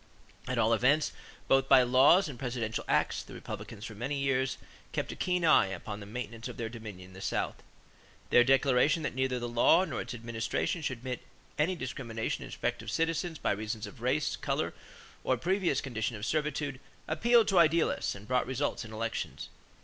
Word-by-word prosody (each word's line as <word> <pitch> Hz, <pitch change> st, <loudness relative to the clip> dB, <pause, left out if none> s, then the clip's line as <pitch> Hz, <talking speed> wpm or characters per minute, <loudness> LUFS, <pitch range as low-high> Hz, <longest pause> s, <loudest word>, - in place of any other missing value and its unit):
At 130 Hz, -, -1 dB
all 115 Hz, 0 st, +3 dB
events, 140 Hz, +6 st, +3 dB, 0.4 s
both 135 Hz, 0 st, +3 dB
by 130 Hz, -2 st, +8 dB
laws 135 Hz, +10 st, +6 dB
and 135 Hz, -5 st, -8 dB
presidential 120 Hz, -4 st, -2 dB
acts, -, -, +1 dB
the -, -, -11 dB
Republicans 105 Hz, -, -7 dB
for 110 Hz, -, -7 dB
many 125 Hz, +7 st, -3 dB
years 135 Hz, -1 st, 0 dB, 0.4 s
kept -, -, -2 dB
a -, -, -6 dB
keen 180 Hz, -2 st, 0 dB
eye 155 Hz, -, +6 dB
upon 95 Hz, +2 st, -6 dB
the 100 Hz, -, -9 dB
maintenance 115 Hz, 0 st, -6 dB
of -, -, -8 dB
their 115 Hz, -1 st, -3 dB
dominion 105 Hz, -6 st, -9 dB
in -, -, -16 dB
the 95 Hz, -, -10 dB
South. -, -, -2 dB, 0.7 s
Their 120 Hz, -, +7 dB
declaration 135 Hz, +4 st, +3 dB
that -, -, -2 dB
neither 130 Hz, 0 st, 0 dB
the 120 Hz, 0 st, -3 dB
law 120 Hz, +10 st, +4 dB
nor -, -, -3 dB
its 125 Hz, 0 st, -6 dB
administration 115 Hz, +8 st, -2 dB
should 130 Hz, -4 st, -2 dB
admit 125 Hz, +1 st, -5 dB, 0.4 s
any 175 Hz, +5 st, +2 dB
discrimination 120 Hz, -6 st, -4 dB
in -, -, -7 dB
respect -, -, -3 dB
of -, -, -7 dB
citizens 165 Hz, +1 st, -1 dB
by -, -, 0 dB
reason 105 Hz, +1 st, -3 dB
of 110 Hz, +3 st, -13 dB
race, 135 Hz, +4 st, +1 dB
color, -, -, -2 dB, 0.5 s
or 130 Hz, -, +1 dB
previous 180 Hz, -, +1 dB
condition 115 Hz, -3 st, -3 dB
of 105 Hz, 0 st, -5 dB
servitude 150 Hz, -2 st, -1 dB, 0.3 s
appealed 235 Hz, -2 st, +4 dB
to 195 Hz, -, +4 dB
idealists 165 Hz, -6 st, +3 dB
and 100 Hz, +2 st, -11 dB
brought 125 Hz, -1 st, +1 dB
results 130 Hz, -1 st, -1 dB
in 110 Hz, -, -10 dB
elections. 115 Hz, +1 st, -4 dB
125 Hz, 190 wpm, -30 LUFS, 115-145 Hz, 0.7 s, by